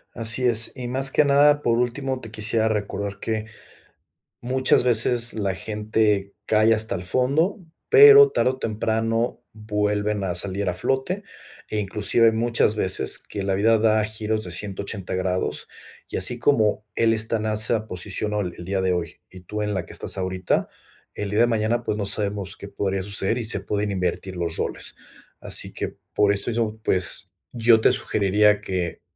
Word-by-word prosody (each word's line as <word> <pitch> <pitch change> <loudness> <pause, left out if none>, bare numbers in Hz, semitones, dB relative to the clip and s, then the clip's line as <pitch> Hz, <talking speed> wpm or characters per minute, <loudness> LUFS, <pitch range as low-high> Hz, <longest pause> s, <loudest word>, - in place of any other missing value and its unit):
Así 115 +2 -2
es, 115 -2 +1
y 125 -2 -5
más 135 +2 -2
que 150 - +3
nada, 145 +1 +4
por 115 0 +2
último, 130 +2 -2
te 115 - -9
quisiera 110 +1 0
recordar 100 -2 -3
que, 110 -1 -2 1.0
muchas 130 +1 +2
veces 120 0 +2
la 100 -4 -1
gente 105 -1 0
cae 110 +1 +4
hasta 110 +1 -2
el 90 - -5
fondo, 140 - +1 0.3
pero 430 -1 +9
tarde 130 - +2
o 130 - -8
temprano 115 +1 -1
vuelven 105 -1 -1
a 90 -2 -2
salir 95 +2 -3
a - - -1
flote 135 - -1 0.5
e 110 - -1
inclusive 105 +3 +2
muchas 115 -1 +1
veces 95 -3 -1
que 100 - -7
la 95 0 0
vida 110 +3 +3
da 110 0 +3
giros 110 0 -2
de 90 - -7
180 100 +1 -5
grados, 95 0 -2 0.4
y - - -3
así - - -1
como 110 -7 +2
él 115 -1 +3
esta 110 +1 +1
en 110 - -4
esa 110 +1 0
posición, 100 +3 -4
ol 100 -4 -2
el 85 - -8
día 95 +1 -1
de 95 - +1
hoy, 85 -3 -3
y 95 - -10
tú 105 +4 -5
en 105 0 -1
la 90 -3 -2
que - - -11
estás - - -1
ahorita, 95 -1 -1 0.5
el 105 - -4
día 105 +2 0
de 120 - +5
mañana, 115 +1 0
pues, 105 - -2
no 105 - -2
sabemos 100 -2 -3
qué 100 - -9
podría 95 -1 -2
suceder 100 +3 -1
y 115 - -3
se 100 -4 -2
pueden 105 +1 -2
invertir 95 0 -2
los 85 -2 -2
roles, - - -4 0.4
así - - -1
que - - -4 0.2
por 100 -1 +3
eso 100 +4 0
yo, 110 -1 -1
pues, 95 0 0 0.2
yo 115 -1 +4
te - - +4
sugeriría 105 0 +3
que 90 -5 -3
105 Hz, 180 wpm, -23 LUFS, 100-115 Hz, 1.0 s, pero